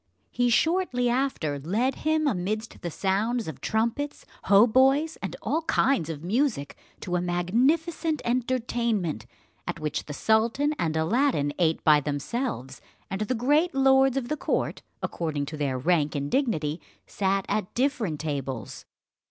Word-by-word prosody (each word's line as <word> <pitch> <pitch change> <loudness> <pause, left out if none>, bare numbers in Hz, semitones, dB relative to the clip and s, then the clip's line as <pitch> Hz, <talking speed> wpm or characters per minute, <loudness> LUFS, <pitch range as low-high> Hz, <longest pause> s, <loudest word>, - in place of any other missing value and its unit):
He 245 0 +1
shortly 255 -3 +2
after 240 - -1
led 215 - 0
him 310 0 +1
amidst 215 -1 -2
the 175 - -3
sounds 205 +7 -1
of 140 -4 -7
trumpets, 235 +7 -1 0.2
hautboys, 260 +9 +5
and - - -4
all 320 - 0
kinds 270 - +1
of 155 -2 -6
music, 215 - 0 0.3
to 180 -1 -1
a - - -1
magnificent 270 - +1
entertainment, 235 - -1 0.4
at - - -3
which 150 -1 -3
the 150 - -6
sultan 230 - +2
and 160 -2 0
Aladdin 160 - +1
ate 165 -2 +1
by 150 -1 +6
themselves, 145 - -3 0.3
and 195 +2 -3
the 235 +4 0
great 295 +8 +2
lords 270 0 +4
of 255 -3 -2
the 305 - -2
court, - - -1 0.2
according 155 -4 -2
to 155 - -6
their 140 -3 -1
rank 150 +1 +1
and 140 0 -2
dignity, 165 - 0 0.2
sat 195 -1 0
at 205 -2 -1
different 240 - 0
tables. 135 -6 -4
215 Hz, 145 wpm, -26 LUFS, 160-265 Hz, 0.4 s, by